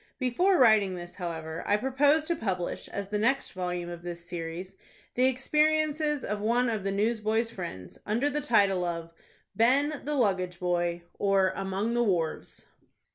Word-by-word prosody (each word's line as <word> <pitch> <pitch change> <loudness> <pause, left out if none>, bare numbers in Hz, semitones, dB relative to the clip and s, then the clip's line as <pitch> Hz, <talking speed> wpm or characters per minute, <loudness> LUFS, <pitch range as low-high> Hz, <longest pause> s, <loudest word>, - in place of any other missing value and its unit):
Before 350 +10 +2
writing 215 -7 +5
this, 175 0 -8
however, 165 -3 -5
I 205 - +3
propose 280 +6 +3
to 340 +2 -1
publish, 190 - -3
as 200 -1 -5
the 210 0 -1
next 255 +6 +1
volume 180 -1 -3
of 175 -1 -7
this 170 -1 -7
series, 175 +2 -6 0.4
the 255 +1 +3
experiences 300 +2 +1
of 210 0 -3
one 235 +3 +2
of 215 -3 -3
the 195 - -1
newsboy's 220 +2 0
friends, 170 - -7
under 235 +7 0
the 295 +1 -1
title 200 -7 +3
of 170 -1 -4 0.4
BEN, 280 +6 +3
THE 295 +1 -2
LUGGAGE 185 -8 0
BOY; 175 -1 -1 0.2
or, 195 -2 +3
AMONG 195 +4 -2
THE 240 - +2
WHARVES. 175 -8 -1
205 Hz, 160 wpm, -28 LUFS, 180-255 Hz, 0.4 s, writing